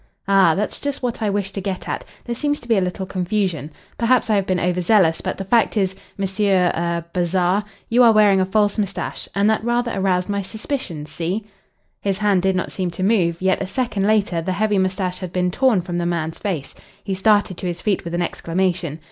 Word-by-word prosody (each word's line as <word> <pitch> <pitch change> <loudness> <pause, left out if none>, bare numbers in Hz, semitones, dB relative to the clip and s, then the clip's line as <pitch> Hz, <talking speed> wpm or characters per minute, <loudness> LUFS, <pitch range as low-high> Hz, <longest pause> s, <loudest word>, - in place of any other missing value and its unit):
"Ah! 195 -5 +5
that's 210 +2 -2
just 285 -2 -4
what 245 -2 -2
I 215 - +1
wish 200 -1 -1
to 195 - -5
get 190 -1 -4
at. - - -3 0.2
There 240 - -2
seems 290 +4 -1
to - - -12
be 230 - +3
a 195 - +3
little 185 +1 -2
confusion. 185 -4 -1 0.3
Perhaps 235 -1 +3
I - - +4
have 195 -2 0
been 185 -1 +1
over 180 +1 0
zealous, 175 -3 +3
but - - -3
the 195 - -5
fact 230 +2 +2
is, 190 -2 +1 0.2
Monsieur 195 -2 +2
er 170 0 -1
Bazarre, 180 +2 +1 0.2
you 240 +2 +3
are 235 -2 +8
wearing 205 -3 +5
a - - +2
false 205 +1 +1
moustache, 200 -2 -3
and 200 +1 +3
that 220 0 +2
rather 240 0 0
aroused 185 -2 +1
my 200 -1 -1
suspicions 195 - -5
see?" 180 +7 -3 0.6
His 195 -2 0
hand 205 -3 +2
did 190 0 +1
not 185 - -2
seem 185 -2 -2
to 175 +2 -5
move, 185 -5 +2
yet 190 0 +2
a 195 - -2
second 205 -2 -1
later 205 -6 +2
the 185 +3 -2
heavy 210 +1 +1
moustache 185 -1 -1
had 185 -2 -6
been 180 -1 0
torn 230 -4 +2
from 175 -1 -3
the 170 - -1
man's 165 -2 -2
face. 175 -9 -3 0.3
He 195 - -3
started 205 0 +2
to 185 - -4
his 175 0 -4
feet 205 -3 0
with 170 0 -4
an 175 - +1
exclamation. 170 -2 -2
190 Hz, 225 wpm, -21 LUFS, 180-210 Hz, 0.6 s, are